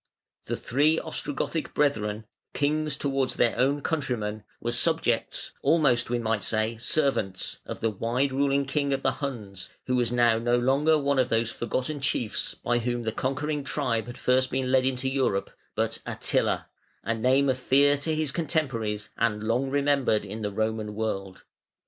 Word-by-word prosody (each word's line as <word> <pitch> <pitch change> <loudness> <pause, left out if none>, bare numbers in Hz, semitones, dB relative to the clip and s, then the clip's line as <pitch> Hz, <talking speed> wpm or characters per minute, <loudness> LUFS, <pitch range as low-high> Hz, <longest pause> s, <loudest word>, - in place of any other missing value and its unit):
] - - -45
The - - -2
three 150 +6 +2
Ostrogothic 160 0 -2
brethren, 110 -7 0 0.3
kings 150 0 0
towards 135 -2 0
their 120 - +2
own 140 +3 +2
countrymen, 115 -9 -2 0.2
were 120 - -2
subjects 120 -2 0
almost, 135 -8 +3
we 120 - +1
might 115 -2 0
say, 110 +1 0
servants 115 -7 0
of - - -6
the 115 - +1
wide 120 +7 0
ruling 140 +1 +1
king 140 0 0
of 135 - -2
the - - +3
Huns, 105 -10 -5 0.2
who 125 - 0
was 120 -2 +1
now 120 -2 +3
no 120 +1 +2
longer 140 +6 +3
one 140 -2 +1
of 130 -1 +2
those 115 0 +1
forgotten 130 +5 -2
chiefs 120 -5 0
by 120 0 0
whom 120 0 -2
the 110 - -1
conquering 145 +5 -2
tribe 125 -6 -1
had 120 - -7
been - - -13
first 130 +1 +3
led 130 0 +2
into 130 0 -1
Europe, 130 -7 0 0.2
but - - -1
ATTILA, - - 0 0.4
a 115 - 0
name 130 +5 +3
of 130 -1 +1
fear 140 +3 +4
to 155 +2 -1
his 155 -3 0
contemporaries 130 -10 -2
and 105 -2 0
long 120 +5 0
remembered 140 -5 +2
in 110 - -6
the 105 - -1
Roman 110 0 -2
world. 95 -3 -3
130 Hz, 170 wpm, -27 LUFS, 115-140 Hz, 0.4 s, fear